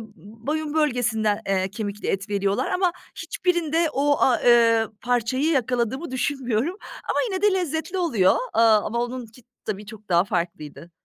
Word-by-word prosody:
boyun 290 +10 -5
bölgesinden, 240 -8 +1
eee, 190 -1 0
kemikli 210 0 -5
et 195 +2 -2
veriyorlar 200 +4 0
ama 365 -1 +2 0.2
hiçbirinde 335 -1 0
o 285 +1 +1
a 255 - +3
eee, 230 -2 +5 0.2
parçayı 245 +3 0
yakaladığımı 255 +2 -1
düşünmüyorum 260 - -1 0.3
ama - - 0
yine 380 -2 -3
de 415 -1 +4
lezzetli 350 0 -2
oluyor, 240 - +3 0.2
eee, - - +4
ama 225 0 +3
onun 245 0 -5
ki 230 +3 -18 0.2
tabii 210 -1 -4
çok 215 -1 -12
daha 170 -1 +4
farklıydı. 170 -3 -4
240 Hz, 145 wpm, -24 LUFS, 210-300 Hz, 0.3 s, eee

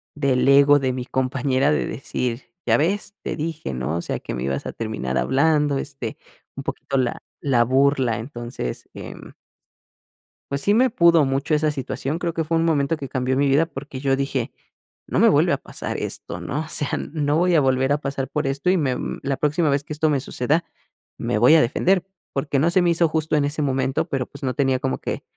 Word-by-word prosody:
del 135 -3 +1
ego 140 +1 +6
de 130 -1 0
mi 125 -1 -4
compañera 130 +2 +1
de 150 - +1
decir: 125 0 -3 0.2
"Ya - - +4
ves, 195 +6 0
te - - -3
dije, 160 - -4
¿no?, 65 +7 -2
o - - -2
sea, - - -3
que - - -6
me 60 - -4
ibas 70 0 -2
a - - -5
terminar 110 - -3
hablando", 145 +1 +2
este, 135 -6 -6 0.4
un - - -6
poquito 140 - -4
la 125 -2 -1 0.2
la 125 -5 +3
burla, 130 -3 +2
entonces, 120 - -6
em. - - -10 1.2
Pues 140 0 -1
sí 205 - +3
me 255 +3 +4
pudo 170 -7 +5
mucho 135 +3 0
esa 155 0 +1
situación, 140 +2 -3
creo 170 -1 -2
que 165 0 -1
fue 165 +2 0
un 165 - +2
momento 155 -1 +1
que 135 -3 -7
cambió 130 0 -1
mi 140 0 +3
vida 140 +4 +4
porque 140 -4 -8
yo 135 -1 +1
dije: 135 -3 -2 0.6
"No - - 0
me - - +6
vuelve - - +3
a - - +1
pasar - - -6
esto, 85 - -5
¿no?", 135 - -3
o 160 - -6
sea, 145 - -1 0.2
no 150 -1 +1
voy 175 0 +3
a 150 - +5
volver 130 +1 +2
a - - +2
pasar 140 -2 -3
por 150 -2 -2
esto 140 +5 0
y 185 - +4
me 135 -6 0
mm, - - -4
la 135 -1 -1
próxima 150 +2 +1
vez 140 0 +1
que 150 - -6
esto 155 +1 +1
me 145 - +2
suceda, 145 +6 -1 0.5
me 105 - -1
voy 125 +8 +6
a 160 - +6
defender, 180 +9 +2 0.3
porque 140 0 0
no 160 - +3
se 185 0 +4
me 175 - +3
hizo 170 0 +3
justo 155 -1 +1
en 145 - +2
ese 150 +2 -2
momento, 135 +2 0
pero 135 -2 -1
pues, 140 - -12
no 130 -1 0
tenía 135 -3 +1
como 130 -1 -1
que, - - -4
140 Hz, 220 wpm, -22 LUFS, 130-155 Hz, 1.2 s, ego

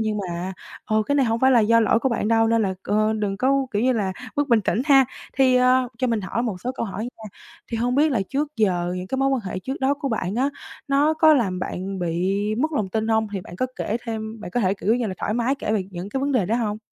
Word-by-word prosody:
nhưng 215 -1 -1
mà, 180 -1 -4 0.3
ờ, 215 0 +1
cái 285 - +1
này 280 -2 +3
hông 225 0 0
phải 265 - +5
là 245 -3 +6
do 230 +2 +4
lỗi 225 0 +3
của 265 - 0
bạn 230 -3 -1
đâu 225 0 +4
nên 230 0 +3
là, 190 -2 -1
ơ, 215 +1 +1
đừng 200 -2 -1
có, 270 +3 +2
kiểu 205 +1 0
như 255 +1 +3
là, 200 -5 -1 0.2
mất 290 0 +1
bình 235 -3 +4
tĩnh 215 +3 0
ha. 275 -3 +6 0.3
Thì, 260 -1 +4
ờ, 255 0 +3
cho 255 - +1
mình 230 -3 0
hỏi 200 +4 -2
một 210 -7 -3
số 250 +6 -3
câu 245 - -3
hỏi 205 +1 -5
nha. 240 -2 -9 0.4
Thì 230 - -3
hông 245 +2 0
biết 295 +2 +3
là 230 - +1
trước 290 +2 -2
giờ 180 -5 +1
những 180 0 -5
cái 260 +7 -3
mối 270 0 +2
quan 270 -2 +1
hệ 185 0 -4
trước 265 +8 -5
đó 270 +1 +2
của 285 -1 -4
bạn, 210 -5 -2
á, 265 +4 +1 0.4
nó 285 +3 +3
có 315 0 +6
làm 195 -9 0
bạn 190 +1 -4
bị 180 +3 0 0.2
mất 305 +8 -1
lòng 215 -9 -1
tin 220 +3 -2
hông? 220 -1 +2
Thì 195 - -3
bạn 175 - -11
có 255 - 0
kể 215 - -2
thêm 220 -1 -5
bạn 205 - -7
có 245 - 0
thể, 190 -2 +2
kiểu 205 +2 +1
như 245 -1 -1
là, 190 - -4
thoải 210 - -2
mái 240 +3 +1
kể 265 -6 -3
về 205 -3 0
những 180 +1 -6
cái 265 +6 -3
vấn 280 +1 0
đề 230 -9 +2
đó 225 +5 +1
hông? 215 -3 -2
225 Hz, 285 wpm, -23 LUFS, 200-260 Hz, 0.4 s, là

